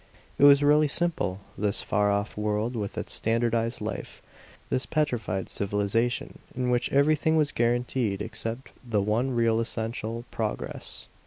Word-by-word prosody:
It 145 Hz, -, +7 dB
was 140 Hz, 0 st, +7 dB
really 150 Hz, +1 st, +5 dB
simple, 145 Hz, -, +1 dB
this 105 Hz, 0 st, 0 dB
far 105 Hz, 0 st, +1 dB
off 100 Hz, +2 st, -1 dB
world 105 Hz, +3 st, -1 dB
with 105 Hz, -3 st, -4 dB
its -, -, -4 dB
standardized 115 Hz, +1 st, 0 dB
life, -, -, -6 dB, 0.5 s
this 130 Hz, -, +1 dB
petrified 120 Hz, -, -1 dB
civilization 105 Hz, +4 st, -1 dB, 0.2 s
in 125 Hz, -1 st, 0 dB
which 120 Hz, -1 st, 0 dB
everything 155 Hz, +3 st, +3 dB
was 150 Hz, -2 st, +2 dB
guaranteed 120 Hz, -3 st, 0 dB
except 115 Hz, +3 st, -5 dB
the 115 Hz, -4 st, 0 dB
one 110 Hz, +6 st, +1 dB
real 115 Hz, -2 st, +2 dB
essential 115 Hz, 0 st, -3 dB
progress. -, -, -4 dB
115 Hz, 140 wpm, -27 LUFS, 105-130 Hz, 0.5 s, It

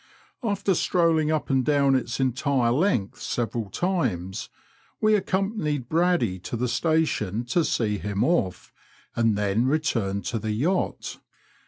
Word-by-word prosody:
After 205 Hz, -4 st, 0 dB
strolling 165 Hz, -3 st, +2 dB
up 155 Hz, -2 st, -1 dB
and 130 Hz, -1 st, +3 dB
down 140 Hz, -1 st, +3 dB
its 125 Hz, -2 st, -1 dB
entire 130 Hz, -1 st, +1 dB
length 125 Hz, -, 0 dB
several 115 Hz, -3 st, -2 dB
times, 110 Hz, -, -2 dB, 0.5 s
we 215 Hz, 0 st, +3 dB
accompanied 190 Hz, -, -1 dB
Braddy 165 Hz, -, +1 dB
to 115 Hz, -, -5 dB
the 125 Hz, +2 st, 0 dB
Station 150 Hz, -, 0 dB
to 160 Hz, +8 st, +1 dB
see 105 Hz, -8 st, 0 dB
him 100 Hz, 0 st, -1 dB
off, 95 Hz, -, 0 dB, 0.4 s
and 115 Hz, -3 st, +2 dB
then 105 Hz, +4 st, +1 dB
returned 115 Hz, -, 0 dB
to 115 Hz, -, -2 dB
the 110 Hz, 0 st, -2 dB
yacht. 160 Hz, -, -1 dB
130 Hz, 135 wpm, -25 LUFS, 110-165 Hz, 0.5 s, and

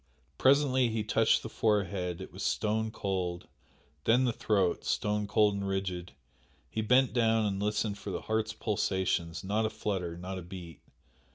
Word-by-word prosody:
Presently 130 Hz, -2 st, +4 dB
he 110 Hz, -1 st, -1 dB
touched 110 Hz, +1 st, +3 dB
the -, -, -4 dB
forehead 100 Hz, -5 st, 0 dB
it 95 Hz, -, -9 dB
was -, -, -8 dB
stone 110 Hz, +1 st, 0 dB
cold 95 Hz, -5 st, -3 dB, 0.6 s
then 125 Hz, +3 st, +4 dB
the 120 Hz, -, +1 dB
throat, 100 Hz, -6 st, +1 dB
stone 105 Hz, 0 st, 0 dB
cold 105 Hz, 0 st, +3 dB
and 100 Hz, 0 st, -3 dB
rigid 95 Hz, -3 st, -3 dB, 0.6 s
he 110 Hz, -, -1 dB
bent 125 Hz, +4 st, +4 dB
down 115 Hz, -2 st, +3 dB
and 100 Hz, -1 st, -1 dB
listened 105 Hz, 0 st, -1 dB
for -, -, -6 dB
the -, -, -3 dB
heart's 110 Hz, 0 st, -1 dB
pulsations, 95 Hz, -5 st, -1 dB
not 105 Hz, +3 st, 0 dB
a 110 Hz, -, +1 dB
flutter 95 Hz, -6 st, -3 dB
not 95 Hz, +2 st, -5 dB
a -, -, -7 dB
beat! 85 Hz, -2 st, -10 dB
105 Hz, 165 wpm, -30 LUFS, 95-110 Hz, 0.6 s, Presently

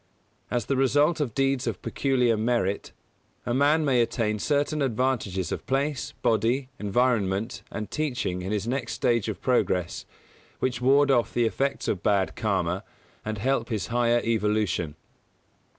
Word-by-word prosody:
As 120 Hz, -1 st, -1 dB
the 135 Hz, -, 0 dB
result 145 Hz, +5 st, +3 dB
of 130 Hz, -8 st, -2 dB
deeds 135 Hz, -1 st, +1 dB
of -, -, -2 dB
peculiar 125 Hz, -4 st, +1 dB
merit, 110 Hz, -3 st, 0 dB, 0.5 s
a 120 Hz, -, -1 dB
man 145 Hz, +4 st, +3 dB
may 130 Hz, -4 st, +3 dB
attain 110 Hz, -2 st, 0 dB
certain 145 Hz, +4 st, 0 dB
advantages 115 Hz, -, 0 dB
of -, -, -5 dB
place, 140 Hz, +1 st, -1 dB
body, 120 Hz, +4 st, +1 dB
environment 105 Hz, -1 st, 0 dB
and 110 Hz, -1 st, -6 dB
teaching 125 Hz, -12 st, -2 dB
in 95 Hz, +2 st, -4 dB
his 105 Hz, 0 st, -1 dB
next 125 Hz, -1 st, -2 dB
stage 115 Hz, -3 st, +1 dB
of 105 Hz, -, -5 dB
progress, 90 Hz, -9 st, 0 dB, 0.5 s
which 125 Hz, -2 st, -2 dB
ward 140 Hz, +2 st, +4 dB
off 120 Hz, -3 st, +1 dB
the 120 Hz, -, +3 dB
effects 135 Hz, +4 st, -1 dB
of 95 Hz, -, -1 dB
bad 100 Hz, -3 st, +1 dB
Karma -, -, -1 dB, 0.4 s
and 110 Hz, 0 st, -3 dB
help 120 Hz, +2 st, 0 dB
his 110 Hz, -3 st, -2 dB
higher 120 Hz, 0 st, +3 dB
evolution. 105 Hz, -8 st, 0 dB
120 Hz, 150 wpm, -26 LUFS, 105-135 Hz, 0.5 s, ward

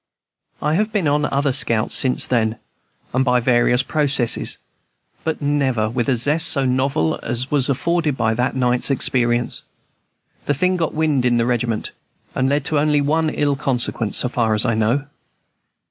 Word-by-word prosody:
I 150 Hz, -, +1 dB
have 210 Hz, +6 st, 0 dB
been 200 Hz, -7 st, 0 dB
on 145 Hz, +1 st, +1 dB
other 140 Hz, -1 st, 0 dB
scouts 115 Hz, -4 st, 0 dB
since 130 Hz, -1 st, +2 dB
then, 110 Hz, -3 st, 0 dB, 0.6 s
and 130 Hz, +1 st, +2 dB
by 125 Hz, -1 st, +2 dB
various 120 Hz, +1 st, +2 dB
processes, 145 Hz, -5 st, 0 dB, 0.7 s
but 160 Hz, -2 st, -3 dB
never 130 Hz, -7 st, 0 dB
with 120 Hz, +1 st, -2 dB
a 130 Hz, -, +3 dB
zest 150 Hz, +7 st, +2 dB
so 140 Hz, -4 st, +2 dB
novel 135 Hz, +5 st, 0 dB
as 125 Hz, +3 st, -2 dB
was 140 Hz, -3 st, +2 dB
afforded 160 Hz, +1 st, 0 dB
by 110 Hz, -2 st, +1 dB
that 125 Hz, +3 st, -1 dB
night's 125 Hz, 0 st, +2 dB
experience. 120 Hz, -3 st, +1 dB, 0.9 s
The 145 Hz, -, +1 dB
thing 180 Hz, +6 st, +1 dB
soon 185 Hz, -, -1 dB
got 165 Hz, -3 st, -2 dB
wind 155 Hz, -4 st, +1 dB
in 120 Hz, -1 st, +2 dB
the 115 Hz, -, +1 dB
regiment, 120 Hz, -2 st, -2 dB, 0.4 s
and 130 Hz, 0 st, 0 dB
led 145 Hz, 0 st, 0 dB
to 150 Hz, 0 st, +1 dB
only 150 Hz, 0 st, +2 dB
one 155 Hz, +3 st, +1 dB
ill 145 Hz, -2 st, 0 dB
consequence, 120 Hz, -5 st, 0 dB
so -, -, +1 dB
far 115 Hz, -3 st, 0 dB
as 105 Hz, -, +1 dB
I 115 Hz, -, +1 dB
know. 115 Hz, +6 st, 0 dB
130 Hz, 175 wpm, -19 LUFS, 120-150 Hz, 0.9 s, a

